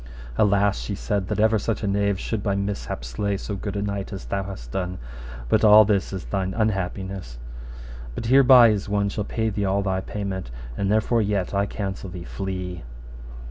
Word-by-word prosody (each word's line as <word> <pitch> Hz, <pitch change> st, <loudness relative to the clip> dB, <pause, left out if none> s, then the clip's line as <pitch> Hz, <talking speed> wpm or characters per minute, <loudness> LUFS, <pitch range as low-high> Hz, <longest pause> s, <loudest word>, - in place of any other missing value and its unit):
Alas, 100 Hz, +3 st, +3 dB
she 100 Hz, -, -4 dB
said, 100 Hz, -2 st, -2 dB
that -, -, -2 dB
ever 110 Hz, 0 st, +4 dB
such 115 Hz, +2 st, -2 dB
a -, -, 0 dB
knave 100 Hz, -1 st, +1 dB
should 110 Hz, -3 st, -3 dB
by 100 Hz, -1 st, 0 dB
mishap 100 Hz, -11 st, -3 dB
slay 100 Hz, +12 st, -2 dB
so 100 Hz, +1 st, -5 dB
good 100 Hz, +1 st, -5 dB
a 100 Hz, -, -1 dB
knight 100 Hz, -1 st, -3 dB
as 95 Hz, -1 st, -6 dB
thou 100 Hz, -, -2 dB
hast 95 Hz, -12 st, -8 dB
done, 90 Hz, +2 st, -3 dB, 0.5 s
but -, -, +2 dB
all 105 Hz, 0 st, +9 dB
this 100 Hz, -3 st, +1 dB
is 95 Hz, -2 st, -5 dB
thine 95 Hz, -1 st, -2 dB
unhappiness. 95 Hz, -, -2 dB, 0.8 s
But -, -, -4 dB
here 130 Hz, +4 st, +6 dB
by 125 Hz, -3 st, +8 dB
is 105 Hz, -2 st, -1 dB
one 100 Hz, 0 st, +1 dB
shall 105 Hz, 0 st, -3 dB
pay 110 Hz, +1 st, -1 dB
thee 100 Hz, 0 st, -2 dB
all 100 Hz, +1 st, +1 dB
thy 95 Hz, -1 st, 0 dB
payment, 95 Hz, -6 st, -4 dB, 0.3 s
and 100 Hz, +5 st, 0 dB
therefore 110 Hz, +2 st, +2 dB
yet 100 Hz, -3 st, -1 dB
I 100 Hz, +1 st, +1 dB
counsel 95 Hz, -2 st, -4 dB
thee, 90 Hz, -1 st, -7 dB
flee. 90 Hz, -2 st, -5 dB
100 Hz, 195 wpm, -24 LUFS, 95-105 Hz, 0.8 s, all